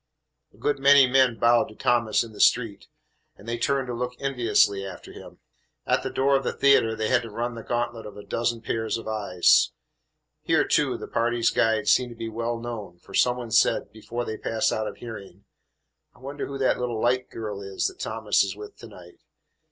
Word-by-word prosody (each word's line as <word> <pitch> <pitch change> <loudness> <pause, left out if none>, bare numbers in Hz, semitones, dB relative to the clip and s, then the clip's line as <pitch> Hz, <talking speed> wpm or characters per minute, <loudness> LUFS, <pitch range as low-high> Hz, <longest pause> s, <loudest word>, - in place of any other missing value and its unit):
A - - -24
good 145 -1 -1
many 140 0 +7
men 130 -2 +3
bowed 120 +1 +4
to 110 - -14
Thomas 115 -2 +1
in 115 -2 -11
the - - -13
street, 115 -5 +2 0.5
and 105 - -16
they 120 0 -3
turned 135 0 0
to 125 - -5
look 125 +1 -4
enviously 115 -7 +1
after 95 - -9
him. - - -12 0.5
At - - +1
the - - -4
door 135 +1 +2
of 135 - +1
the - - -2
theatre 135 -5 +3
they 110 0 -2
had 125 -1 +3
to 115 - -8
run 120 +3 -3
the 115 - -8
gantlet 120 -1 -3
of 105 - -11
a 105 - -9
dozen 115 0 -2
pairs 115 0 -2
of 115 - -9
eyes. 100 -5 +3 0.7
Here, - - +1
too, - - +1
the - - -8
party's 120 0 +1
guide 110 -2 +1
seemed 125 -1 +3
to 120 - -10
be 115 0 -5
well 115 +1 -3
known, 115 -7 -7
for 95 - -17
some 125 +4 +3
one 120 -2 -7
said, - - +2
before 120 +3 -6
they 110 - -5
passed 115 -1 0
out 110 0 -2
of - - -7
hearing, 100 -4 -10 0.7
"I - - -21
wonder 140 +3 -6
who 140 - -6
that 135 -1 +1
little 120 -2 -2
light 125 +2 0
girl 105 -3 -6
is 95 -1 -3
that 380 - -3
Thomas - - +1
is - - -4
with 420 -1 -10
to - - -11
night? - - -15
115 Hz, 215 wpm, -25 LUFS, 110-125 Hz, 0.7 s, many